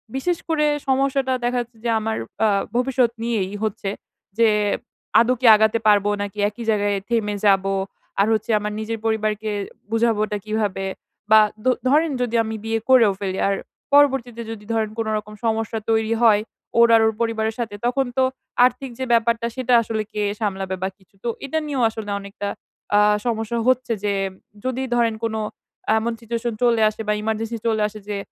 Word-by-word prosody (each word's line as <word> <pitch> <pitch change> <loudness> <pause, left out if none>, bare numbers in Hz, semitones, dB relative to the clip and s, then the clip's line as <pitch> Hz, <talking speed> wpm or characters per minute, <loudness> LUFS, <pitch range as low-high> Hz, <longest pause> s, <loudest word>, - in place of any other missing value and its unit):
বিশেষ 340 +6 0
করে 310 -2 +2 0.2
সমস্যাটা 270 0 +1
দেখা 245 +1 0
যাচ্ছে 240 -1 -11
যে - - +1
আমার 220 0 -2 0.3
আ - - +5 0.3
ভবিষ্যৎ 250 -1 +2
নিয়েই 210 -5 -1
হচ্ছে, 205 -2 -2 0.5
যে, 230 -1 +6 0.7
আদৌ 235 +2 +4
কি - - 0
আগাতে 220 +1 +3
পারবো? 205 -1 +4
নাকি 205 0 -5
একই 215 +3 -9
জাগায়ে 205 -2 +1
থেমে 215 -3 0
যাবো? 195 -1 +3 0.5
আর 200 - +4
হচ্ছে 220 +1 -1
আমার 210 0 -3
নিজের 225 +1 -4
পরিবারকে, 215 -1 0 0.4
বুঝাবোটা 220 -2 +1
কিভাবে? 210 -3 -1 0.5
বা 220 - +9 0.3
দো 255 - +5 0.2
ধরেন 305 +3 +3
যদি 240 -1 -1
আমি 220 0 -4
বিয়ে 225 0 0
করেও 240 -5 +6
ফেলি, 190 -2 -3
আর 200 - +1 0.4
পরবর্তীতে 265 -5 +3
যদি 210 -2 -8
ধরেন 220 -1 0
কোনো 225 -1 -1
রকম 210 0 -7
সমস্যা 225 0 0
তৈরি 220 0 +2
হয়, 215 -3 +5 0.4
ওর 235 - +8
আর 225 - +5
ওর 220 - +2
পরিবারের 220 -1 0
সাথে 225 -3 -3
তখন 260 +2 +1
তো, 260 - +4 0.4
আর্থিক 255 +2 -1
যে - - -1
ব্যাপারটা 230 0 +2
সেটা 255 -1 0
আসলে 220 -1 -2
কে 210 - -2 0.2
সামলাবে 195 -3 -2
বা 190 - 0
কিছু? 190 0 -29
তো 240 - -1 0.2
এটা 275 +4 -2
নিয়েও 275 -4 0
আসলে 220 -2 -7
অনেকটা, 200 0 -6 0.5
আ - - +6 0.3
সমস্যা 225 -1 -1
হচ্ছে 255 -1 +2
যে 205 -1 +1 0.5
যদি 260 0 -1
ধরেন 230 -2 +2
কোন, 225 -1 -1 0.6
এমন 230 +2 -1
সিচুয়েশন 235 +1 -3
চলে 235 -2 +3
আসে 215 - -8
বা 210 - +2
ইমার্জেন্সি 220 +1 -2
চলে 220 -1 +1
আসে 215 0 -10
যে, 205 - -2
225 Hz, 175 wpm, -22 LUFS, 210-240 Hz, 0.7 s, বা